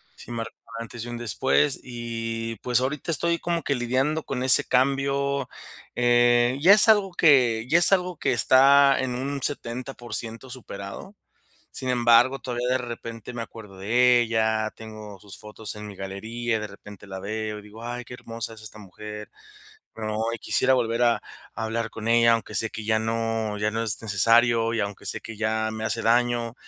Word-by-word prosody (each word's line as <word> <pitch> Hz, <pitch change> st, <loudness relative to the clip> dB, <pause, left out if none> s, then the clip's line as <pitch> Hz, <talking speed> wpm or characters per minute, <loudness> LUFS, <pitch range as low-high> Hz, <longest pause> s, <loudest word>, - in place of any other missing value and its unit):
Sí -, -, -12 dB
marco 115 Hz, -1 st, -5 dB, 0.2 s
un -, -, -4 dB
antes 115 Hz, 0 st, -8 dB
y 120 Hz, -, -7 dB
un 120 Hz, -, -5 dB
después, 120 Hz, +5 st, +1 dB
y, 115 Hz, -1 st, -5 dB
pues, 125 Hz, -1 st, +1 dB
ahorita 140 Hz, +5 st, -2 dB
estoy 170 Hz, +2 st, 0 dB
como 170 Hz, -1 st, -2 dB
que 140 Hz, -, 0 dB
lidiando 130 Hz, +6 st, 0 dB
con 125 Hz, -2 st, -4 dB
ese 130 Hz, -1 st, +5 dB
cambio. 140 Hz, +1 st, 0 dB, 0.5 s
Eh, 120 Hz, +1 st, +3 dB
ya 180 Hz, +6 st, +7 dB
es 210 Hz, +2 st, +8 dB
algo 205 Hz, -3 st, +4 dB
que 125 Hz, -9 st, +3 dB
ya 165 Hz, -, +5 dB
es 175 Hz, -, +6 dB
algo 180 Hz, -2 st, +1 dB
que -, -, 0 dB
está 135 Hz, +3 st, +5 dB
en 130 Hz, -2 st, -2 dB
un 140 Hz, +2 st, -4 dB
70% 120 Hz, -3 st, -5 dB
superado. 115 Hz, -, -8 dB, 0.6 s
Sin 130 Hz, -, -4 dB
embargo, 120 Hz, +2 st, +4 dB
todavía 125 Hz, -1 st, -3 dB
de 130 Hz, +1 st, +2 dB
repente 115 Hz, -1 st, -7 dB
me 120 Hz, -, -4 dB
acuerdo 105 Hz, -4 st, -11 dB
de 120 Hz, +5 st, +3 dB
ella, 110 Hz, -1 st, 0 dB
tengo 110 Hz, -2 st, -10 dB
sus 100 Hz, -1 st, -12 dB
fotos 105 Hz, -1 st, -8 dB
en 105 Hz, 0 st, -8 dB
mi 105 Hz, -, -9 dB
galería 110 Hz, +5 st, -4 dB
y -, -, -2 dB
de 105 Hz, -, -5 dB
repente 100 Hz, 0 st, -13 dB
la 95 Hz, -1 st, -7 dB
veo 105 Hz, +2 st, -4 dB
y -, -, -11 dB
digo: 105 Hz, +2 st, -12 dB
"Ay 120 Hz, +1 st, -5 dB
qué 125 Hz, -, -9 dB
hermosa 115 Hz, -2 st, -7 dB
es 110 Hz, -, -14 dB
esta 110 Hz, 0 st, -10 dB
mujer", 105 Hz, +1 st, -9 dB, 0.6 s
¿no?, 110 Hz, -1 st, -4 dB, 0.2 s
y 115 Hz, -, -4 dB
quisiera 130 Hz, -, +3 dB
volver 120 Hz, -2 st, +1 dB
a 120 Hz, -1 st, +4 dB, 0.4 s
a 110 Hz, -, -4 dB
hablar 115 Hz, 0 st, -3 dB
con 115 Hz, 0 st, -6 dB
ella, 115 Hz, 0 st, +5 dB
aunque 115 Hz, -1 st, -2 dB
sé 115 Hz, -, +1 dB
que 110 Hz, -, -7 dB
ya 110 Hz, 0 st, +2 dB
no 115 Hz, -1 st, -2 dB
ya 105 Hz, +1 st, 0 dB
no 115 Hz, +1 st, -2 dB
es 110 Hz, -2 st, 0 dB
necesario 115 Hz, +2 st, +3 dB
y 115 Hz, -, -1 dB
aunque 100 Hz, -1 st, -5 dB
sé 100 Hz, -, -2 dB
que 115 Hz, -, -9 dB
ya 110 Hz, 0 st, -1 dB
me 110 Hz, 0 st, -5 dB
hace 115 Hz, -, -1 dB
daño, 120 Hz, 0 st, +1 dB
115 Hz, 190 wpm, -25 LUFS, 110-125 Hz, 0.6 s, es